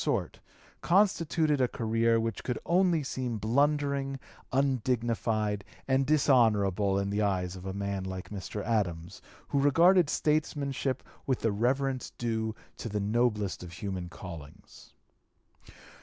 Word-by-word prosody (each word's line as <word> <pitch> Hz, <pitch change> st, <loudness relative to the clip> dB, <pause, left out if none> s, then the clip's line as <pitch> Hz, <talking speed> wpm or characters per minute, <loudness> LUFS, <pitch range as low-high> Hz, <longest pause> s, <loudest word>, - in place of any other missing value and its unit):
238) -, -, +2 dB
sort, -, -, -8 dB, 0.4 s
constituted 165 Hz, -6 st, +2 dB
a 125 Hz, -, +4 dB
career 115 Hz, 0 st, +1 dB
which 115 Hz, 0 st, -3 dB
could 125 Hz, -3 st, -2 dB
only 175 Hz, -3 st, +3 dB
seem 125 Hz, -3 st, -3 dB
blundering, 140 Hz, +4 st, +1 dB, 0.3 s
undignified, 115 Hz, -5 st, 0 dB, 0.2 s
and 135 Hz, 0 st, +2 dB
dishonorable 105 Hz, -9 st, +3 dB
in 100 Hz, 0 st, -1 dB
the 105 Hz, +1 st, 0 dB
eyes 95 Hz, -3 st, 0 dB
of 95 Hz, +1 st, -8 dB
a -, -, -2 dB
man 100 Hz, -1 st, -2 dB
like 95 Hz, -1 st, -6 dB
Mr. 105 Hz, +1 st, -5 dB
Adams, 95 Hz, -5 st, -2 dB, 0.3 s
who 140 Hz, -, +1 dB
regarded 165 Hz, +4 st, +5 dB
statesmanship 140 Hz, -4 st, 0 dB, 0.2 s
with 130 Hz, -2 st, 0 dB
the 115 Hz, -, +1 dB
reverence 130 Hz, +5 st, 0 dB
due 110 Hz, -2 st, -2 dB, 0.2 s
to 115 Hz, -, -5 dB
the 105 Hz, 0 st, -2 dB
noblest 105 Hz, -1 st, 0 dB
of 90 Hz, -1 st, -9 dB
human 90 Hz, -1 st, -5 dB
callings. 85 Hz, -4 st, -11 dB
115 Hz, 130 wpm, -29 LUFS, 100-140 Hz, 0.4 s, regarded